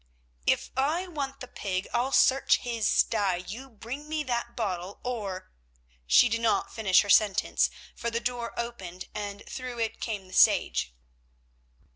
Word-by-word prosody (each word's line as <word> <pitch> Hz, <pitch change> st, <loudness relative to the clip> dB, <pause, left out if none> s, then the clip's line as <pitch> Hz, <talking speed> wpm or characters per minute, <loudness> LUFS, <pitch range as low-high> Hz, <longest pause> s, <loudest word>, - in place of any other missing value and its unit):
"If -, -, +2 dB
I 305 Hz, +8 st, +1 dB
want 280 Hz, -6 st, -5 dB
the 255 Hz, -, -6 dB
pig, 190 Hz, -5 st, -3 dB
I'll 245 Hz, +3 st, +1 dB
search 270 Hz, 0 st, +4 dB
his 230 Hz, -3 st, -2 dB
stye. 200 Hz, -5 st, +2 dB
You 205 Hz, +10 st, -7 dB
bring 255 Hz, +6 st, -8 dB, 0.2 s
that 235 Hz, -1 st, -2 dB
bottle, 190 Hz, -4 st, -3 dB
or——" 205 Hz, -7 st, -4 dB, 0.6 s
She 245 Hz, -, +7 dB
did 230 Hz, 0 st, -1 dB
not 230 Hz, -1 st, +1 dB
finish 195 Hz, -5 st, +4 dB
her 205 Hz, -, -6 dB
sentence, 205 Hz, -2 st, +4 dB, 0.3 s
for 235 Hz, -, -2 dB
the 230 Hz, 0 st, -1 dB
door 240 Hz, -1 st, -3 dB
opened, 195 Hz, -7 st, -6 dB
and 205 Hz, -1 st, -5 dB
through 255 Hz, -2 st, -6 dB
it 225 Hz, -1 st, -2 dB
came 210 Hz, -4 st, -3 dB
the 185 Hz, -, -14 dB
sage. -, -, +4 dB
230 Hz, 150 wpm, -28 LUFS, 200-250 Hz, 0.6 s, She